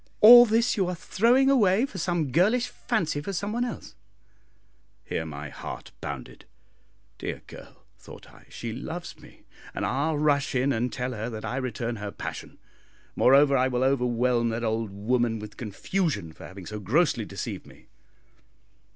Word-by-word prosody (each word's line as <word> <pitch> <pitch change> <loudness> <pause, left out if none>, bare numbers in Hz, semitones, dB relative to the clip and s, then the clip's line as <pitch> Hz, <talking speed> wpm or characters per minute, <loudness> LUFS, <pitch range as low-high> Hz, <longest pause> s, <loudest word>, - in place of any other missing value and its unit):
All 240 +2 +10
this 230 +3 +2
you 190 -3 +1
are 180 - -2
throwing 240 +10 +2
away 225 -4 +4
for 200 -8 -8
some 170 -5 -1
girlish 220 - +2
fancy 155 -10 -2
for 195 +7 -5
some 205 +4 -3
one 240 +1 0
else." 245 -3 -6 1.1
Here 80 - -4
my 75 -1 -7
heart - - -8
bounded. - - -7 0.7
"Dear - - -5
girl," - - -14
thought - - -13
I, - - -19
"she 115 -1 -6
loves 160 +8 -7
me, - - -17 0.3
and - - -2
I'll 145 +4 0
rush 145 -2 +1
in 135 +2 +2
and 120 +1 -1
tell 125 0 -3
her 110 +1 -4
that 110 -2 -6
I 125 - -3
return 120 -2 -3
her 105 0 -5
passion. - - -7 0.6
Moreover, 140 +2 +5
I 130 0 +3
will 125 -1 0
overwhelm 125 -2 +1
that 115 +1 -3
old 110 -1 -1
woman 115 +3 0
with 105 -1 -9
confusion 110 - -2
for - - -11
having 95 -1 -11
so 105 +3 -6
grossly 125 - +1
deceived - - -6
me." - - -17
130 Hz, 165 wpm, -26 LUFS, 115-180 Hz, 1.1 s, All